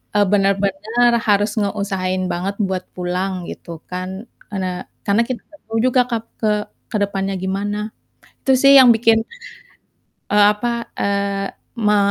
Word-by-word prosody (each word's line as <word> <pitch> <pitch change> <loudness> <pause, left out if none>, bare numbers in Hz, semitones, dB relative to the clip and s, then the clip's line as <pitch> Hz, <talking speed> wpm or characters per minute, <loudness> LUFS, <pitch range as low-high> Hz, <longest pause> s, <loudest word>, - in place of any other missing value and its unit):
eee, 205 0 +5
bener-bener 200 +4 +2 0.2
harus 205 0 +3
ngeusahain 195 -2 -1
banget 190 +3 -2
buat 190 -1 -2
pulang, 180 0 -2
gitu 165 -2 -10
kan, 185 +3 -5 0.3
ene 185 -1 -3 0.2
karena 205 +3 +3
kita 250 -5 -4
gak 300 -1 -18
tahu 225 0 -2
juga 255 0 +4
kap 230 -2 -2 0.2
ke 215 -1 +2 0.4
ke 220 - 0
depannya 195 -1 -2
gimana. 205 +3 -2 0.6
Itu 265 - +4
sih 275 +2 +7
yang 255 -2 +8
bikin, 225 0 +4 1.1
eee, 205 0 +6
apa, 235 +2 -3
eee, 200 0 -1 0.4
ma 210 0 +4
200 Hz, 140 wpm, -20 LUFS, 190-225 Hz, 1.1 s, yang